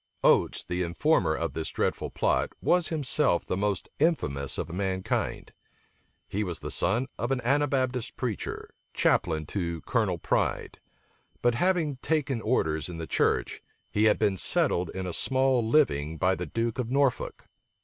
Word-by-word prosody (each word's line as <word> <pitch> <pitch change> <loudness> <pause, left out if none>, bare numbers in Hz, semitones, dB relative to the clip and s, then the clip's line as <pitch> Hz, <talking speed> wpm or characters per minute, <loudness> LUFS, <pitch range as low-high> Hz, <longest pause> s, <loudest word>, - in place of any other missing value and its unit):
Oates, - - +3
the 90 +1 -3
informer 85 - +2
of 85 -4 -3
this 80 +1 -3
dreadful - - -1
plot, - - 0
was 175 -2 +2
himself 150 - +1
the - - -2
most 100 -1 -1
infamous 100 - +1
of - - -4
mankind. 95 0 -2 0.7
He 105 +2 -2
was 90 -5 -4
the - - -6
son 120 +6 +2
of 120 - -1
an 135 - +1
Anabaptist 130 -2 0
preacher, 120 -5 -4 0.2
chaplain 80 -2 +2
to 85 -1 -3
Colonel 105 -7 0
Pride; - - -1 0.6
but 120 0 +4
having 165 -1 +1
taken 140 -4 -1
orders 80 -9 0
in 85 - -6
the 80 - -4
church, - - 0 0.3
he 105 +1 +2
had 105 - +4
been 100 -3 +1
settled 85 -1 +1
in 95 -1 -3
a 90 - -4
small 130 +1 +2
living 80 - +2
by 95 +4 +2
the 90 -2 -4
duke 115 - -2
of 120 -2 -2
Norfolk. 135 -1 0
105 Hz, 155 wpm, -28 LUFS, 85-130 Hz, 0.7 s, but